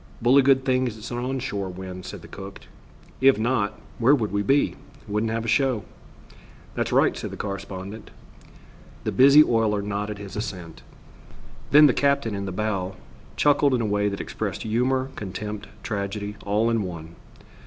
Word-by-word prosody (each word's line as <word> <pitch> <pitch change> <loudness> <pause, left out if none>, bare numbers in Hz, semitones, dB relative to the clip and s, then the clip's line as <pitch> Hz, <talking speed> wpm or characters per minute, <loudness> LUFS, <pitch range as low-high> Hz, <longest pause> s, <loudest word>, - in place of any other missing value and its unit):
"Bully 130 +4 +5
good 135 0 +3
thing 130 -1 +2
it's 110 0 -7
an 120 - -3
on 130 +2 -2
shore 100 -7 -3
wind," 90 0 -8
said - - -8
the - - -11
cook; 95 0 -9 0.6
"If 135 -2 +6
not, 110 -2 0 0.2
where 130 +5 +5
would 110 -6 -2
we 100 0 0
be? 135 +8 +2 0.3
Wouldn't 105 +2 -1
have 115 0 -2
a - - -4
show." 120 -1 +2 0.9
"That's - - -2
right," - - +3
said - - -5
the - - -8
correspondent. 100 +1 -6 0.9
The - - -1
busy 140 +3 +7
oiler 110 -5 +1
nodded 105 +1 -3
his 100 -1 -9
assent. 95 -6 -6 0.9
Then 150 +1 +8
the 135 - +5
captain, 140 -5 +1
in 100 0 -3
the 95 - -4
bow, 95 -2 -2 0.4
chuckled 145 -2 +3
in 120 - 0
a - - 0
way 105 0 +1
that 100 - -5
expressed - - -4
humor, 130 +4 0
contempt, 105 +1 -6 0.2
tragedy, 100 -1 -3
all 105 +3 +2
in 115 -1 +1
one. 85 -3 -7
110 Hz, 170 wpm, -24 LUFS, 100-130 Hz, 0.9 s, Then